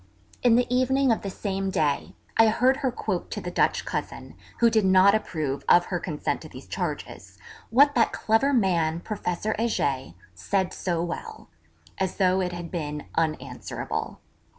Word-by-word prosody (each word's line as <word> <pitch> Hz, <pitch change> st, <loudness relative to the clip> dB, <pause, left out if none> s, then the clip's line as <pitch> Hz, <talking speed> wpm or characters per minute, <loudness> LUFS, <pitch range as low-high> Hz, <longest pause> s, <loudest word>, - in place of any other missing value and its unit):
In 240 Hz, -2 st, +5 dB
the 245 Hz, +1 st, +3 dB
evening 265 Hz, +1 st, +3 dB
of 225 Hz, -, +1 dB
the 200 Hz, -, -4 dB
same 195 Hz, 0 st, -3 dB
day 155 Hz, -6 st, -1 dB, 0.2 s
I 225 Hz, -, +6 dB
heard 255 Hz, +4 st, +3 dB
her 260 Hz, -, -1 dB
quote -, -, -3 dB
to -, -, -4 dB
the -, -, -5 dB
Dutch -, -, +1 dB
cousin, -, -, -5 dB, 0.2 s
who 235 Hz, -, +5 dB
did 220 Hz, -2 st, +3 dB
not 190 Hz, +1 st, +6 dB
approve 155 Hz, -10 st, -2 dB
of 175 Hz, 0 st, +6 dB
her 180 Hz, -, -2 dB
consent 155 Hz, -3 st, -3 dB
to -, -, -10 dB
these -, -, -11 dB
charges, -, -, -5 dB, 0.3 s
'what 285 Hz, +5 st, +5 dB
that 235 Hz, -3 st, +3 dB
clever 225 Hz, +6 st, +2 dB
man, 170 Hz, -, +1 dB
Professor 210 Hz, 0 st, -2 dB
Heger) 140 Hz, -, -1 dB, 0.2 s
said 190 Hz, -, -1 dB
so 170 Hz, -2 st, -2 dB
well,' 175 Hz, -, -6 dB, 0.5 s
as 190 Hz, -1 st, -1 dB
though 190 Hz, -1 st, +3 dB
it 180 Hz, -1 st, -1 dB
had 175 Hz, -1 st, -7 dB
been 150 Hz, -3 st, -4 dB
unanswerable. 140 Hz, -6 st, -3 dB
190 Hz, 165 wpm, -26 LUFS, 165-225 Hz, 0.5 s, I